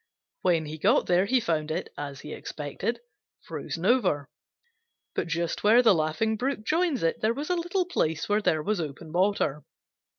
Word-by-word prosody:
When 165 Hz, -3 st, +2 dB
he 155 Hz, +1 st, -7 dB
got -, -, +3 dB
there 180 Hz, +2 st, +3 dB
he 255 Hz, +3 st, +3 dB
found 160 Hz, -7 st, -1 dB
it, 155 Hz, -, -3 dB
as 140 Hz, -2 st, -6 dB
he 150 Hz, -, -7 dB
expected, 160 Hz, -, -4 dB, 0.4 s
frozen 165 Hz, +2 st, -5 dB
over. 190 Hz, -, +2 dB, 0.8 s
But -, -, -2 dB
just 170 Hz, 0 st, -2 dB
where 225 Hz, +4 st, +6 dB
the 220 Hz, -4 st, +7 dB
Laughing 165 Hz, +7 st, 0 dB
Brook 260 Hz, -1 st, -2 dB
joins 325 Hz, -, +1 dB
it 165 Hz, -, 0 dB
there 220 Hz, +2 st, +2 dB
was 295 Hz, +6 st, -3 dB
a -, -, +3 dB
little 350 Hz, +2 st, 0 dB
place 160 Hz, -, -1 dB
where 210 Hz, +1 st, +2 dB
there 155 Hz, -6 st, +1 dB
was 210 Hz, -1 st, 0 dB
open 155 Hz, +1 st, -7 dB
water. 175 Hz, -5 st, +1 dB
180 Hz, 175 wpm, -27 LUFS, 155-235 Hz, 0.8 s, the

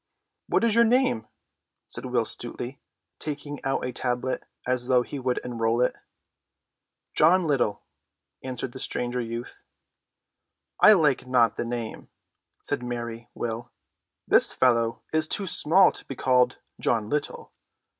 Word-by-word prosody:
"What -, -, +1 dB
is 230 Hz, -2 st, +3 dB
your 235 Hz, +1 st, +6 dB
name?" 235 Hz, -, +2 dB, 0.6 s
said -, -, -6 dB
Will 120 Hz, -2 st, +1 dB
Stutely, 120 Hz, +4 st, -6 dB, 0.4 s
taking 145 Hz, -1 st, -6 dB
out 135 Hz, -1 st, -1 dB
a 125 Hz, -, -3 dB
tablet 125 Hz, +1 st, -2 dB, 0.2 s
as 125 Hz, -1 st, 0 dB
though 125 Hz, -1 st, +4 dB
he 140 Hz, -, -6 dB
would 125 Hz, -1 st, -1 dB
enroll 115 Hz, -1 st, 0 dB
it. 125 Hz, -, +2 dB, 1.2 s
"John 180 Hz, +1 st, +4 dB
Little," 135 Hz, -9 st, 0 dB, 0.6 s
answered 130 Hz, -1 st, -4 dB
the 130 Hz, -, -9 dB
stranger 125 Hz, 0 st, -1 dB
youth. 115 Hz, +1 st, -7 dB, 1.2 s
"I 215 Hz, -, +9 dB
like 150 Hz, -9 st, +2 dB
not 125 Hz, -3 st, +3 dB
the -, -, -3 dB
name," 115 Hz, -2 st, -5 dB, 0.5 s
said -, -, -2 dB
merry 120 Hz, -1 st, -5 dB
Will. 115 Hz, 0 st, -4 dB, 0.6 s
"This -, -, +4 dB
fellow 115 Hz, -2 st, +2 dB
is 155 Hz, 0 st, +2 dB
too 200 Hz, -, 0 dB
small 185 Hz, +1 st, +5 dB
to -, -, -9 dB
be 135 Hz, -, -7 dB
called 125 Hz, 0 st, +2 dB, 0.2 s
John 110 Hz, -3 st, 0 dB
Little. 150 Hz, +5 st, -3 dB
125 Hz, 135 wpm, -26 LUFS, 120-145 Hz, 1.2 s, I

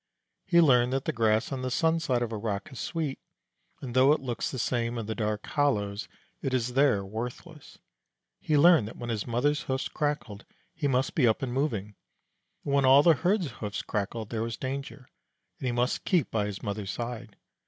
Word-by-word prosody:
He 170 Hz, -2 st, +5 dB
learned 125 Hz, -5 st, +4 dB
that 135 Hz, 0 st, -1 dB
the -, -, -1 dB
grass 110 Hz, +1 st, +1 dB
on 135 Hz, -2 st, -3 dB
the 130 Hz, -, -2 dB
sun 160 Hz, +5 st, +2 dB
side 125 Hz, -6 st, 0 dB
of 115 Hz, -, -4 dB
a -, -, -3 dB
rock 105 Hz, -2 st, -4 dB
is 130 Hz, -, -9 dB
sweet, 155 Hz, -5 st, -3 dB, 0.6 s
and 125 Hz, -3 st, -5 dB
though 130 Hz, +3 st, +6 dB
it 155 Hz, -, 0 dB
looks 125 Hz, -3 st, -3 dB
the 130 Hz, -, -5 dB
same 120 Hz, -1 st, -1 dB
in 115 Hz, -, -3 dB
the 110 Hz, -, -3 dB
dark 105 Hz, -2 st, -2 dB
hollows, 105 Hz, -9 st, 0 dB, 0.3 s
it 135 Hz, -2 st, -1 dB
is 125 Hz, 0 st, -1 dB
there 130 Hz, -8 st, +3 dB
worthless. 125 Hz, -, -7 dB, 0.6 s
He 150 Hz, -, +1 dB
learned 160 Hz, -7 st, +6 dB
that 115 Hz, -, -10 dB
when 120 Hz, -1 st, -4 dB
his 110 Hz, 0 st, -3 dB
mother's 140 Hz, +6 st, +1 dB
hoofs 130 Hz, 0 st, -2 dB
crackled 145 Hz, -8 st, -3 dB, 0.3 s
he 155 Hz, -3 st, -1 dB
must 130 Hz, 0 st, +1 dB
be 130 Hz, -6 st, +3 dB
up 110 Hz, +4 st, +1 dB
and 125 Hz, -2 st, -2 dB
moving, 110 Hz, -7 st, -1 dB, 0.7 s
and 140 Hz, -, -1 dB
when 140 Hz, -1 st, +4 dB
all 135 Hz, +2 st, +7 dB
the 170 Hz, -, +7 dB
herd's 180 Hz, +1 st, 0 dB
hoofs 105 Hz, -2 st, -5 dB
crackled 105 Hz, +1 st, -3 dB
there 110 Hz, -2 st, -2 dB
was 115 Hz, 0 st, -3 dB
danger, 135 Hz, 0 st, -5 dB, 0.5 s
and 130 Hz, -, -3 dB
he -, -, +1 dB
must 120 Hz, +1 st, 0 dB
keep 175 Hz, -, +1 dB
by 105 Hz, -2 st, 0 dB
his 100 Hz, -2 st, -6 dB
mother's 100 Hz, -1 st, -4 dB
side. 120 Hz, +1 st, -5 dB
125 Hz, 205 wpm, -28 LUFS, 110-140 Hz, 0.7 s, all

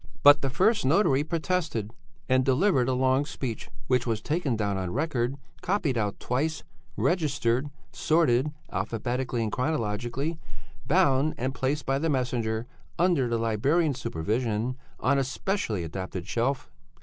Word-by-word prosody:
"But 145 Hz, 0 st, +8 dB
the 135 Hz, -, 0 dB
first 205 Hz, -, +2 dB
notary 145 Hz, -1 st, +3 dB
protested, 160 Hz, -, -1 dB, 0.4 s
and 130 Hz, 0 st, +3 dB
delivered 135 Hz, -1 st, +3 dB
a -, -, +2 dB
long 130 Hz, +2 st, +3 dB
speech, 130 Hz, -6 st, -5 dB, 0.2 s
which 125 Hz, +5 st, +1 dB
was 115 Hz, -2 st, 0 dB
taken 145 Hz, +1 st, -1 dB
down 100 Hz, -2 st, -1 dB
on 95 Hz, -2 st, -3 dB
record, 135 Hz, -, -1 dB, 0.3 s
copied 175 Hz, -8 st, 0 dB
out 105 Hz, -3 st, -1 dB
twice, 155 Hz, +6 st, -1 dB, 0.3 s
registered, 145 Hz, -6 st, +1 dB, 0.2 s
sorted 150 Hz, -4 st, +2 dB, 0.2 s
(alphabetically 120 Hz, +1 st, -2 dB
and 110 Hz, -, -2 dB
chronologically), 125 Hz, +3 st, -2 dB, 0.5 s
bound 150 Hz, -3 st, +3 dB
and 130 Hz, +2 st, -2 dB
placed 140 Hz, +3 st, -1 dB
by 135 Hz, +1 st, +1 dB
the 165 Hz, +2 st, 0 dB
messenger 120 Hz, -4 st, -1 dB, 0.3 s
under 170 Hz, -7 st, +3 dB
the 115 Hz, -1 st, 0 dB
librarian's 135 Hz, +7 st, +1 dB
supervision 115 Hz, +5 st, -1 dB, 0.2 s
on 140 Hz, +1 st, +2 dB
a -, -, +2 dB
specially 130 Hz, -, -2 dB
adapted 95 Hz, +2 st, -5 dB
shelf. 130 Hz, +3 st, -1 dB
130 Hz, 135 wpm, -27 LUFS, 115-150 Hz, 0.5 s, But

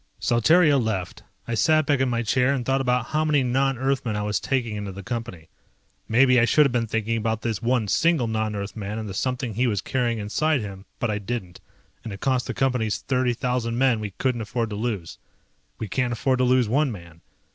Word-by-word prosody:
Saltario 145 Hz, +5 st, +4 dB
left. 105 Hz, -6 st, -3 dB, 0.3 s
I 120 Hz, -, -3 dB
sat 155 Hz, +7 st, +3 dB
back 145 Hz, -1 st, +2 dB
in 130 Hz, -1 st, +1 dB
my 120 Hz, -1 st, 0 dB
chair 125 Hz, +4 st, +2 dB
and 125 Hz, -3 st, -3 dB
thought 135 Hz, 0 st, +1 dB
about 125 Hz, -2 st, 0 dB
how 155 Hz, +1 st, +1 dB
many 150 Hz, -3 st, +2 dB
non 135 Hz, +1 st, +1 dB
Earthmen 130 Hz, -3 st, -1 dB
I 105 Hz, -, -2 dB
was 105 Hz, 0 st, 0 dB
taking 120 Hz, -5 st, -1 dB
into 105 Hz, -1 st, -5 dB
the 100 Hz, +1 st, -9 dB
Company. 115 Hz, -9 st, -6 dB, 0.6 s
Maybe 125 Hz, +2 st, +5 dB
I 115 Hz, -, +4 dB
should 150 Hz, +5 st, +4 dB
have 140 Hz, -, +1 dB
been 120 Hz, -2 st, 0 dB
thinking 115 Hz, +1 st, -1 dB
about 110 Hz, 0 st, -2 dB
this 115 Hz, -4 st, -2 dB
one 120 Hz, -2 st, +1 dB
single 165 Hz, -, +2 dB
non 110 Hz, -1 st, -2 dB
Earthman 100 Hz, +1 st, -5 dB
and 110 Hz, -1 st, -4 dB
the 95 Hz, -, -6 dB
something 125 Hz, +2 st, -2 dB
he 125 Hz, +5 st, +1 dB
was 105 Hz, -4 st, 0 dB
carrying 120 Hz, +2 st, -1 dB
inside 140 Hz, +8 st, 0 dB
him, 100 Hz, -2 st, -8 dB
but 120 Hz, -, -1 dB
I 105 Hz, -, -2 dB
didn't, 100 Hz, -4 st, -5 dB, 0.4 s
and 115 Hz, -, -6 dB
it 100 Hz, -, -7 dB
cost 130 Hz, -2 st, 0 dB
the -, -, -4 dB
Companies 125 Hz, -5 st, 0 dB
thirty 125 Hz, -2 st, 0 dB
thousand 120 Hz, -1 st, -1 dB
men 130 Hz, -3 st, +3 dB
we 105 Hz, -1 st, -4 dB
couldn't 125 Hz, -3 st, 0 dB
afford 115 Hz, +1 st, -3 dB
to -, -, -3 dB
lose. 105 Hz, -6 st, -4 dB, 0.6 s
We 110 Hz, -, -5 dB
can't 125 Hz, +4 st, -1 dB
afford 130 Hz, +3 st, 0 dB
to 130 Hz, -, +3 dB
lose 125 Hz, -2 st, +3 dB
one 140 Hz, +4 st, +1 dB
man. 85 Hz, -5 st, -11 dB
120 Hz, 220 wpm, -24 LUFS, 105-130 Hz, 0.6 s, Maybe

